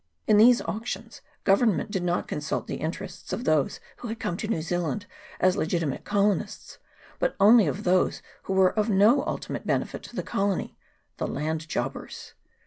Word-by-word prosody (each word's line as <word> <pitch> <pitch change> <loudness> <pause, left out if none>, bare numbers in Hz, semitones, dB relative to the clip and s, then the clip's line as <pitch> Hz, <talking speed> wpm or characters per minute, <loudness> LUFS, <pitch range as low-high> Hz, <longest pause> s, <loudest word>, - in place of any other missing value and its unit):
In 210 - +5
these 235 +3 +6
auctions 225 0 -5 0.2
Government 205 +1 +2
did 190 - -1
not 175 0 -1
consult 150 +1 -3
the - - -4
interests 170 +4 -6
of 220 +6 -3
those 155 - +1 0.2
who 240 - -7
had 225 0 -5
come 175 - -2
to 215 - -4
New 170 -8 -1
Zealand 175 +3 -2 0.3
as 185 0 +3
legitimate 160 -4 -1
colonists, 205 0 -1 0.4
but - - 0
only 215 +2 +7
of 205 - -3
those 185 0 +2 0.2
who 195 - -2
were 190 -1 +4
of 215 +1 0
no 215 +8 +5
ultimate - - -4
benefit - - -1
to - - -12
the - - -2
colony 200 -1 -1 0.4
the - - -2
land 155 +2 -3
jobbers. - - -5
195 Hz, 170 wpm, -26 LUFS, 175-215 Hz, 0.4 s, only